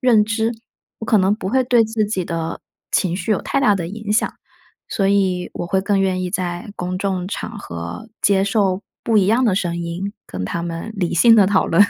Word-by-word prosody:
认 230 -4 +5
知？ 225 +1 0 0.5
“我 220 - -5
可 235 - +4
能 190 +2 +3
不 190 -3 -5
会 260 +3 +2
对 240 -2 +4
自 220 -1 0
己 195 -4 -2
的 165 -1 -3 0.3
情 180 -3 +1
绪 190 +3 -4
有 - - 0
太 275 - 0
大 210 -7 +4
的 170 -3 -3
影 210 +2 -4
响， 215 - +2 0.6
所 195 -2 +1
以 190 -3 +1
我 - - -4
会 190 +2 +1
更 200 0 +1
愿 185 -1 +1
意 180 - -3
在 185 +3 -3
公 180 +1 -3
众 190 -2 -1
场 210 +2 -5
合 85 - -7
接 195 -1 +3
受 200 -2 +1 0.2
不 225 - +1
一 195 -3 +4
样 230 +5 +3
的 205 -5 +3
声 175 -3 -1
音， 175 +4 -4
跟 90 0 -5
他 170 - -3
们 170 +5 -5
理 180 -4 -1
性 230 +7 +7
地 205 -4 +6
讨 195 -1 +2
论。 170 +5 +5
195 Hz, 235 characters per minute, -20 LUFS, 180-215 Hz, 0.6 s, 性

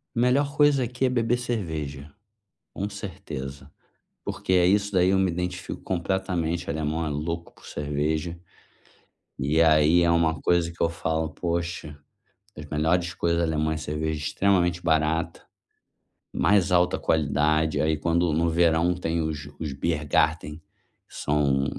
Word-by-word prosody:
Melhor 135 +4 +2
coisa 145 -2 +4
aqui 125 +2 -1
é - - +3
beber 120 -1 +1
cerveja, 80 - -4 0.6
com 100 - -3
certeza, 70 -9 -7 0.5
porque 95 - -2
é 90 -1 +5
isso 100 +2 +2
daí 90 -2 +3
eu 95 - +3
me 95 -2 +2
identifico 90 +1 -4
completamente. 90 -2 -2
Alemão 80 +2 -1
é 75 - -2
louco 85 +3 -4
por - - -19
cerveja, 75 +3 -2 1.0
e 75 +4 +1
aí 80 +2 +5
é 85 - +3
uma 80 -2 +2
coisa 85 -1 +2
que 85 - -11
eu 85 - +3
falo: 80 -1 -2
“Poxa, 85 -3 -4 0.6
as 75 - -8
melhores 80 +4 0
coisas 85 0 0
alemãs, 80 -1 0
cerveja 75 +1 -2
extremamente 90 +1 +1
barata, 80 0 0 0.9
mais 95 0 +2
alta 90 0 +3
qualidade”. 80 +1 +1
Aí 80 0 +1
quando 85 +1 +1
no 85 +2 +1
verão 85 +1 +3
tem 85 -2 -1
os 75 -1 -5
Biergarten, 75 +1 0 0.5
que - - -16
são, 70 -2 +1
85 Hz, 135 wpm, -25 LUFS, 75-90 Hz, 1.0 s, é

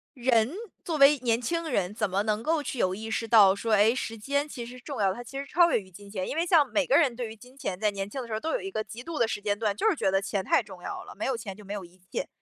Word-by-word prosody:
人 240 -2 +2 0.3
作 325 -3 -2
为 285 +1 +7
年 235 -1 +1
轻 335 +6 -2
人， 200 -7 0
怎 210 -1 -1
么 195 +2 0
能 215 0 0
够 320 +2 +1
去 270 - -4
有 185 -3 +2
意 220 +2 -6
识 225 +1 -2
到 205 -4 +7
说， 220 +2 -1
哎， 210 +2 +5
时 225 -3 -4
间 280 +6 -1
其 250 -5 -7
实 240 - -9
是 - - -11
重 275 0 -6
要 195 - +4
的， - - -1
它 245 - -7
其 270 +3 -8
实 280 - -4
超 340 +4 +4
越 - - +3
于 190 -2 -14
金 200 +3 -13
钱？ 190 -2 -3
因 - - -3
为 330 +2 +1
像 330 -5 +5
每 285 +2 +1
个 275 - +4
人 280 -8 +3
对 240 -1 -3
于 220 - -9
金 250 +4 -17
钱 195 -9 -4
在 210 0 +2
年 195 0 -4
轻 265 +5 -4
的 240 - -8
时 225 - -5
候 215 - -1
都 320 - -2
有 - - 0
一 390 - -5
个 215 - -2
极 235 +3 -9
度 330 +1 -5
的 235 - +3
时 210 - -3
间 205 0 0
段， 210 -2 0
就 440 - +2
是 400 - +1
觉 235 - +1
得 195 0 +2
钱 195 0 -2
太 330 - +3
重 - - -12
要 - - -5
了， - - -11
没 - - -4
有 265 - 0
钱 205 -4 -7
就 210 - -13
没 200 - -5
有 205 -2 -5
一 175 +2 -20
切。 - - -2
230 Hz, 365 characters per minute, -28 LUFS, 205-275 Hz, 0.3 s, 为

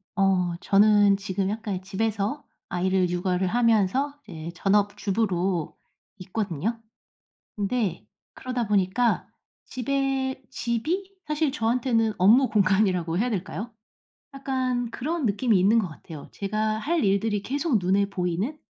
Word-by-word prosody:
어 190 -3 +2
저는 205 +1 +5
지금 195 -1 -2
약간 215 -1 -3
이 180 - -5
집에서 210 +6 -2 0.3
아이를 185 0 +1
육아를 180 +1 0
하면서 230 +5 +2
이제 160 +1 -7
전업주부로 195 -3 0 0.4
있거든요. 195 +1 -3 0.8
근데 205 -3 -1 0.3
그러다 250 -3 -3
보니까 205 +4 +1 0.4
집에 265 0 -2
집이 320 - -2
사실 300 0 0
저한테는 230 -3 +1
업무 235 +8 +5
공간이라고 190 -4 +2
해야 245 +5 +1
될까요? 205 +3 -4 0.6
약간 255 -3 -1
그런 300 +4 -2
느낌이 210 0 +2
있는 200 +5 +4
것 205 -5 0
같아요. 155 -1 -11
제가 215 +2 -2
할 315 +3 0
일들이 200 +1 +1
계속 280 +1 0
눈에 195 +2 +2
보이는? 190 - -2
210 Hz, 280 characters per minute, -25 LUFS, 190-245 Hz, 0.8 s, 저는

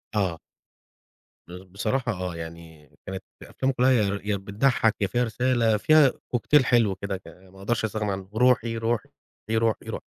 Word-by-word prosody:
آه. 90 -5 0 1.1
بصراحة 100 +8 -3
آه، 90 -3 -4
يعني 80 -3 -10 0.2
كانت 95 0 -6 0.2
أفلام 135 +1 -2
كلها 130 +1 +3 0.3
يا 105 -1 -1
بتضحك، 110 +3 +1
يا 100 - +2
فيها 120 +3 0
رسالة 115 -1 +1
فيها 155 +2 +5 0.2
كوكتيل 130 +2 +3
حلو 115 -6 +3
كده 95 0 -4
ما 95 +1 -16
أقدرش 110 +2 -1
أستغنى 105 -1 -2
عنه 95 0 -6
روحي، 115 -1 +2
روحي، 115 -1 -1 0.4
روحي، 115 0 +1
روحي. - - -5
110 Hz, 140 wpm, -25 LUFS, 95-120 Hz, 1.1 s, فيها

